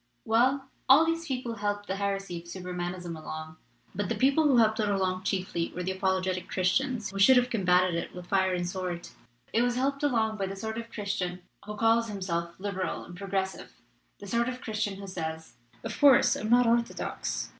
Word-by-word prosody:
"Well, 260 +4 +2 0.2
all 285 +5 +8
these 330 0 -1
people 250 -3 -3
helped 205 0 -2
the 195 0 -3
heresy 195 -3 -2
of 170 - -15
Supermanism 180 -1 -5
along. 155 0 -7 0.4
But 205 -2 -2
the - - 0
people 280 +4 +3
who 275 -4 +5
helped 220 -1 +4
it 210 -1 +1
along 190 -1 0
chiefly 185 -3 -1
were 180 - -3
the 185 - -1
apologetic 190 -1 -1
Christians, 215 +3 0
who 195 - -5
should 255 +6 +7
have 250 0 +2
combated 180 -4 +3
it 170 +1 -4
with 180 -1 -8
fire 190 0 +2
and 175 0 -2
sword. 180 -1 -4 0.4
It 230 - +3
was 245 0 +1
helped 275 +2 0
along 225 -6 +1
by 195 -2 -1
the 195 - -5
sort 220 +3 -4
of 230 0 -8
Christian 190 -4 -3 0.2
who 210 - -5
calls 225 +1 +3
himself 175 -5 -3
' - - -30
liberal* 190 -2 -3
and 175 - -11
'progressive,' 190 0 -3 0.4
the - - -9
sort 235 +4 0
of 250 0 -5
Christian 215 -2 -2
who 200 0 -8
says, 160 -4 -5 0.3
'Of - - -5
couse, 280 -4 +6
I'm 215 - -4
not 245 +1 +5
orthodox.' 235 0 -1
200 Hz, 200 wpm, -28 LUFS, 185-235 Hz, 0.4 s, all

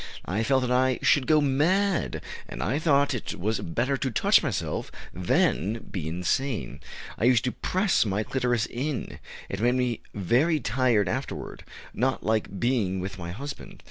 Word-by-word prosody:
I 100 +5 -1
felt 130 +3 +2
that 125 - -1
I 130 0 +3
should 135 -3 +4
go 155 -1 +5
mad, 170 +7 +1 0.3
and - - -4
I 140 - 0
thought 145 -3 +3
it 125 - -5
was 110 +4 0
better 120 +11 -1
to 130 - -1
touch 115 - +4
myself - - -3 0.2
than 90 +3 +1
be 85 -6 -4
insane.... 90 +10 -2 0.4
I 110 - +2
used 125 -2 +4
to 125 - 0
press 190 +1 +1
my 105 0 -1
clitoris 120 -2 0
in.... 135 +1 -4 0.3
It 95 - -5
made 120 +2 +3
me 125 -3 0
very 130 - +2
tired 115 -3 +2
afterward - - -4 0.3
not - - 0
like 110 -2 0
being 115 -7 +1
with 95 +1 -5
my 85 -1 -6
husband." 135 +11 -7
120 Hz, 165 wpm, -26 LUFS, 105-135 Hz, 0.4 s, go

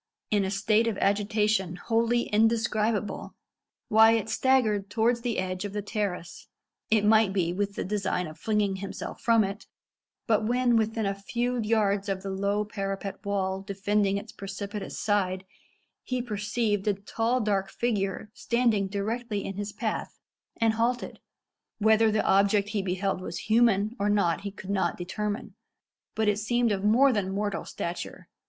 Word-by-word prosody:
In 205 -2 +3
a 190 - -1
state 215 +3 +2
of 220 -4 -1
agitation 205 -2 +1
wholly 230 +5 +1
indescribable, 220 -1 0 0.6
Wyat 220 0 +5
staggered 220 -7 +2
towards 235 +2 +1
the 235 -1 -2
edge 185 0 -2
of 205 -1 -5
the 205 -1 -3
terrace 200 -5 -4 0.4
it 215 -1 +3
might 220 -2 +5
be 175 -3 0
with 200 +1 -2
the - - -2
design 190 -2 -1
of 155 -1 -10
flinging 210 -3 0
himself 195 +1 -6
from 230 -2 +4
it 200 +3 -5 0.6
but 220 -2 +2
when 245 +2 +2
within 220 0 +1
a 195 - 0
few 240 +5 -2
yards 210 -2 +1
of 190 -1 -2
the 195 - -4
low 200 +2 0
parapet 195 -1 -5
wall 190 -1 -1
defending 200 0 0
its 205 +2 -7
precipitous 200 +1 -6
side, 190 -3 0 0.6
he 255 -1 -2
perceived 210 -2 -1
a 205 - +3
tall 225 +5 -1
dark 200 -4 0
figure 210 -3 -2
standing 230 -4 +1
directly 210 +1 -3
in 195 - -4
his 205 0 -3
path, 220 +1 -4 0.4
and 225 -1 +2
halted. 235 +2 -1 0.6
Whether 220 +1 +4
the 215 0 +1
object 200 +1 +3
he 210 -2 -1
beheld 190 0 -1
was 175 -2 -5
human 220 -1 +2
or 205 +1 +1
not 200 -5 +2
he 200 - -4
could 195 0 -8
not 195 -1 0
determine, 210 +5 -4 0.6
but 220 -1 +1
it 210 0 +2
seemed 240 +2 +1
of 195 -1 -1
more 250 +6 +5
than 195 -3 -1
mortal 205 +1 -2
stature. 170 +1 -6
210 Hz, 160 wpm, -27 LUFS, 195-225 Hz, 0.6 s, Wyat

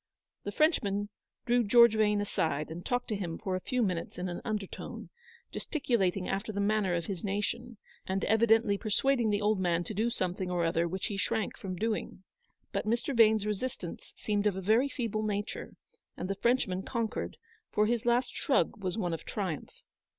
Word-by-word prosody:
The 205 - -2
Frenchman 205 - +2 0.4
drew 240 0 +3
George 235 +1 +7
Yane 210 -1 +3
aside, 160 -7 -1
and 170 +2 -6
talked 245 0 -1
to 215 - 0
him 175 -5 -3
for 190 -4 -2
a - - -1
few 250 +3 0
minutes 180 -5 -2
in 180 +1 -2
an 175 - -5
undertone, 210 -4 -5 0.4
gesticulating 200 - 0
after 200 +3 -2
the 200 - -3
manner 200 -3 +2
of 170 -1 -2
his 185 -3 -5
nation, 210 +4 -2 0.3
and 190 +1 -1
evidently 225 -1 +4
persuading 235 +2 +2
the 205 0 +1
old 210 -1 +2
man 175 -2 +1
to 195 - -4
do 220 +4 +1
something 185 -4 -2
or 175 -1 +1
other 165 +1 +1
which 185 +2 -3
he 205 -3 -3
shrank 210 +1 -1
from 185 -2 -5
doing. 215 -1 -2 0.5
But - - -2
Mr. 235 +5 0
Vane's 220 -2 +5
resistance 210 -4 -4
seemed 210 -1 0
of 200 - +1
a - - -3
very 225 +8 +3
feeble 230 -6 -2
nature, 210 0 -3 0.4
and 180 - -3
the 195 - 0
Frenchman 200 -4 +1
conquered, 230 +1 -3 0.3
for 210 - +3
his 235 +1 +1
last 240 +1 +2
shrug 265 -7 +1
was 185 +2 -1
one 175 -6 -1
of 165 - -4
triumph. 185 -8 -4
210 Hz, 185 wpm, -31 LUFS, 185-230 Hz, 0.5 s, George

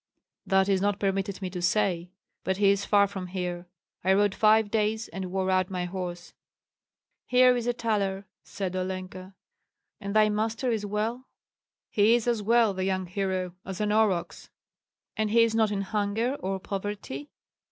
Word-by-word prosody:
"That 190 -1 +3
is 195 -2 +2
not 205 0 0
permitted 195 0 -1
me 185 - -3
to 180 -1 -5
say. 180 -2 +1 0.3
But 190 0 -1
he 200 -1 +5
is 200 0 0
far 200 -1 +5
from 190 -2 -6
here; 180 -1 -4 0.4
I 190 +1 +4
rode 205 0 +3
five 215 -1 +4
days, 220 +1 0
and 190 -1 -5
wore 190 0 0
out 185 0 +2
my 180 -2 -2
horse." 175 -1 -6 0.9
"Here 250 0 +5
is 240 -1 -2
a 245 - +2
thaler!" 200 -4 -1 0.2
said 190 -2 -5
Olenka. 185 0 -5 0.6
"And 200 +1 -5
thy 215 0 +6
master 220 +4 -1
is 210 -2 -2
well?" 225 +5 -2 0.6
"He 215 +3 +4
is 240 0 -1
as 235 -3 +1
well, 225 0 +3
the 190 0 -3
young 190 -1 -1
hero, 185 -1 -2
as 190 -1 -6
an 210 -1 0
aurochs." 210 -5 0 0.7
"And 215 -1 0
he 230 +2 +5
is 230 -1 +1
not 220 -1 +3
in 200 -1 -1
hunger 210 +4 -1
or 190 0 -3
poverty?" 195 -8 -5
200 Hz, 175 wpm, -27 LUFS, 185-215 Hz, 0.9 s, thy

